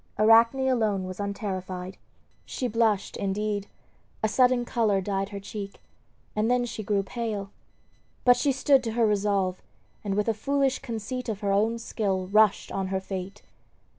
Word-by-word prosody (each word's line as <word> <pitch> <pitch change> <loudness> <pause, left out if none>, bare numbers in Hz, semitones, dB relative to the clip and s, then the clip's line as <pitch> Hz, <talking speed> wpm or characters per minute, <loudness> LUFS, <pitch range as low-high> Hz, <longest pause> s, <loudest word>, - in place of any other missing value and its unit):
Arachne 230 +5 +5
alone 215 -7 +1
was 185 +1 -7
unterrified. 190 -2 -4 0.5
She 255 - -3
blushed, 220 -3 +1
indeed; 205 +1 -2 0.6
a - - +4
sudden 250 +1 +3
color 220 -5 +1
dyed 195 0 -2
her 200 -1 -6
cheek, 200 0 -7 0.6
and 215 +2 +1
then 250 0 +2
she 230 - -5
grew 200 -1 0
pale. 205 -2 -4 0.7
But 245 -1 +7
she 285 - +1
stood 270 0 +3
to 225 - -2
her 235 0 +3
resolve, 200 -3 +1 0.4
and 200 -2 -2
with 210 +1 0
a 225 - +3
foolish 275 +4 0
conceit 240 +1 -5
of 210 -1 -4
her 200 -1 0
own 220 +4 +2
skill 200 -5 -2
rushed 215 0 +3
on 195 -1 -2
her 190 0 -1
fate. 190 0 -6
210 Hz, 160 wpm, -27 LUFS, 195-235 Hz, 0.7 s, But